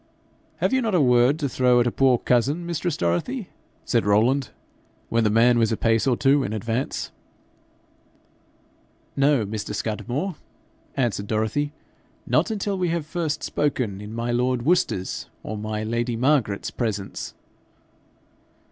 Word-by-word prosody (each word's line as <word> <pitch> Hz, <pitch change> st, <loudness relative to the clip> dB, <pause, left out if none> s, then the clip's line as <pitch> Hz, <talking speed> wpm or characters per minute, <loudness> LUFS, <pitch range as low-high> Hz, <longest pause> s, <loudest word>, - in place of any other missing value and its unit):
'Have -, -, 0 dB
you 260 Hz, -, +3 dB
not 220 Hz, -5 st, 0 dB
a -, -, +4 dB
word 125 Hz, +1 st, +4 dB
to 150 Hz, -3 st, -1 dB
throw 125 Hz, -1 st, +3 dB
at 120 Hz, -, +3 dB
a 120 Hz, -, +1 dB
poor 130 Hz, -1 st, +3 dB
cousin, 135 Hz, +9 st, +1 dB
mistress 170 Hz, -1 st, -2 dB
Dorothy?' 180 Hz, -, -1 dB, 0.4 s
said -, -, +2 dB
Rowland, 115 Hz, +7 st, +2 dB, 0.6 s
when 115 Hz, 0 st, +2 dB
the 105 Hz, -, +3 dB
man 120 Hz, +3 st, +4 dB
was 115 Hz, -1 st, +2 dB
a 110 Hz, -, 0 dB
pace 115 Hz, +2 st, +2 dB
or 125 Hz, -3 st, +2 dB
two 140 Hz, +1 st, +4 dB
in 105 Hz, -, -3 dB
advance. 115 Hz, +4 st, -2 dB, 2.0 s
'No, 140 Hz, -5 st, +3 dB
Mr. 105 Hz, 0 st, -4 dB
Scudamore,' 120 Hz, -, -3 dB, 0.6 s
answered 115 Hz, -6 st, 0 dB
Dorothy; 110 Hz, +7 st, 0 dB, 0.5 s
'not -, -, +2 dB
until 205 Hz, -2 st, -2 dB
we 180 Hz, -, +1 dB
have 165 Hz, -2 st, -1 dB
first 160 Hz, -2 st, -2 dB
spoken 125 Hz, -9 st, -1 dB
in 105 Hz, +1 st, -8 dB
my 115 Hz, +1 st, -2 dB
lord 125 Hz, 0 st, +1 dB
Worcester's 140 Hz, -, 0 dB
or 110 Hz, -, -5 dB
my 110 Hz, 0 st, -3 dB
lady 115 Hz, +2 st, -1 dB
Margaret's 120 Hz, -5 st, +1 dB
presence.' 105 Hz, -5 st, -4 dB
120 Hz, 145 wpm, -24 LUFS, 110-145 Hz, 2.0 s, a